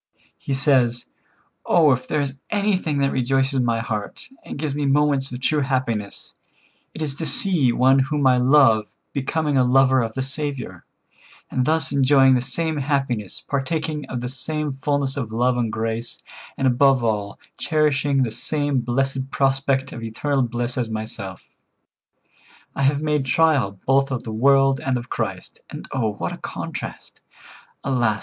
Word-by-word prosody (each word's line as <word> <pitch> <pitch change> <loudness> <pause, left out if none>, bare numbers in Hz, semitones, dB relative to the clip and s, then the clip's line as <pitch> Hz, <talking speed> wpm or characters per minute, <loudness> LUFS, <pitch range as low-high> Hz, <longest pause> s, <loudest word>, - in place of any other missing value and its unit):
He 135 - -2
says: 130 -4 +2 0.6
"Oh, 160 -5 +4
if 130 0 -1
there 150 - 0
is 135 -1 -4
anything 200 -7 0
that 140 - +2
rejoices 135 +1 +1
my 115 -2 +1
heart, 105 -3 -5
and - - -7
gives 150 -1 -2
me 145 0 -1
moments 140 -1 +2
of 125 - -6
true 150 +3 +1
happiness, 130 -7 -2 0.6
it 160 - -4
is 145 -3 -3
to 165 - -3
see 170 -11 +2
one 130 +3 +4
whom 140 +2 0
I 130 -1 +5
love 125 -5 +4 0.2
becoming 145 +1 -1
a - - +5
lover 130 +1 +4
of 115 -1 -4
the 130 - -1
Saviour, 140 -2 -3 0.7
and 125 - 0
thus 160 -2 +1
enjoying 135 -1 +5
the 125 - +2
same 155 +5 -2
happiness, 135 -7 -2
partaking 150 +1 -2
of 125 -2 -4
the 125 - -3
same 150 +3 -4
fulness 140 0 -1
of 120 -6 -4
love 125 +3 +1
and 120 -3 -1
grace, 115 +1 -3 0.4
and 135 - -1
above 130 0 +4
all, 105 -3 -1 0.2
cherishing 145 -3 +1
the 115 - -2
same 145 +4 -1
blessed 135 +2 -1
prospect 135 0 0
of 115 - -7
eternal 135 +5 -1
bliss 120 +1 -2
as 120 -2 -2
myself. 110 -3 -6 1.3
I - - -2
have 140 +2 +2
made 150 -3 0
trial 135 -8 +2
both 135 +1 +3
of 130 -3 -3
the 110 - -6
world 135 +3 +4
and 130 -2 -1
of 120 +1 -7
Christ, 100 -5 -4
and - - -8
oh, 115 -5 -1
what - - -4
a - - -7
contrast! - - -7 0.6
Alas! 120 -6 +1
135 Hz, 165 wpm, -22 LUFS, 120-145 Hz, 1.3 s, I